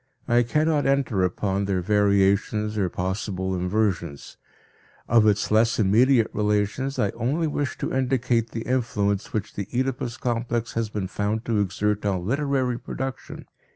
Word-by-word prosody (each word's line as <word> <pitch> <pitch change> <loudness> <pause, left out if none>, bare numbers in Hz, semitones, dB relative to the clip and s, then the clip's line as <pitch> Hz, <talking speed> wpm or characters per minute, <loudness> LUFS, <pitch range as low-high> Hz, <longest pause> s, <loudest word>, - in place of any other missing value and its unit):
I 120 +1 +4
cannot 150 +4 +1
enter 135 -8 +1
upon 95 +2 -1
their 95 -2 -1
variations 105 +1 +2
or 100 -4 0
possible 95 +1 -3
inversions. 90 -5 -2 0.7
Of 115 -2 +5
its 105 0 +1
less 115 +2 +3
immediate 115 +4 +4
relations 105 +6 0
I 100 - +1
only 135 +8 -1
wish 145 -2 -2
to - - -3
indicate 125 -3 +1
the 115 0 -5
influence 105 -6 -1
which 105 -1 -3
the 100 - -5
Oedipus 125 -2 -2
complex 120 -1 -2
has 115 -2 -1
been 105 -2 -3
found 105 +4 -2
to 115 -3 +1
exert 105 +1 -1
on 95 -4 -1
literary 130 -1 0
production. 135 -1 -6
110 Hz, 145 wpm, -24 LUFS, 100-125 Hz, 0.7 s, Of